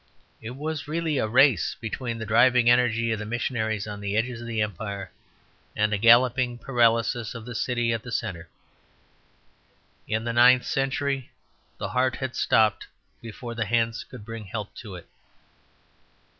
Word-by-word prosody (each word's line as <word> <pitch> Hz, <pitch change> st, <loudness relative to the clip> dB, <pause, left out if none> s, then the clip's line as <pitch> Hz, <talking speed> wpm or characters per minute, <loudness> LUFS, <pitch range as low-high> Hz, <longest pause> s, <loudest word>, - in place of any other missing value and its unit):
It 115 Hz, +3 st, -7 dB
was 155 Hz, +2 st, -4 dB
really 160 Hz, -2 st, -1 dB
a -, -, 0 dB
race 120 Hz, -, +3 dB
between 115 Hz, +1 st, -4 dB
the 110 Hz, -, -5 dB
driving 120 Hz, +2 st, +4 dB
energy 115 Hz, -2 st, +2 dB
of 110 Hz, -, -1 dB
the 105 Hz, -, -5 dB
missionaries 110 Hz, -3 st, -2 dB
on 105 Hz, -1 st, -7 dB
the 100 Hz, +1 st, -2 dB
edges 120 Hz, +1 st, -1 dB
of 120 Hz, -, -8 dB
the 115 Hz, -2 st, -3 dB
Empire 100 Hz, -2 st, -4 dB, 0.6 s
and 105 Hz, 0 st, +1 dB
the 105 Hz, -, 0 dB
galloping 120 Hz, +2 st, +4 dB
paralysis 115 Hz, -2 st, +1 dB
of 115 Hz, -1 st, -8 dB
the 125 Hz, -, -7 dB
city 120 Hz, 0 st, 0 dB
at 115 Hz, -, -2 dB
the 125 Hz, -, -9 dB
centre. 85 Hz, -5 st, -4 dB, 1.6 s
In 110 Hz, +1 st, -1 dB
the 120 Hz, 0 st, -2 dB
ninth 125 Hz, +1 st, +6 dB
century 135 Hz, -1 st, -1 dB, 0.5 s
the -, -, -4 dB
heart 130 Hz, 0 st, +1 dB
had 130 Hz, -2 st, -5 dB
stopped 110 Hz, -2 st, +2 dB, 0.3 s
before 115 Hz, +1 st, -8 dB
the 115 Hz, -1 st, -2 dB
hands 115 Hz, +1 st, 0 dB
could 105 Hz, -, -12 dB
bring 115 Hz, -1 st, -7 dB
help 105 Hz, +1 st, -6 dB
to 105 Hz, -6 st, -8 dB
it. 90 Hz, -, -11 dB
115 Hz, 160 wpm, -25 LUFS, 110-125 Hz, 1.6 s, ninth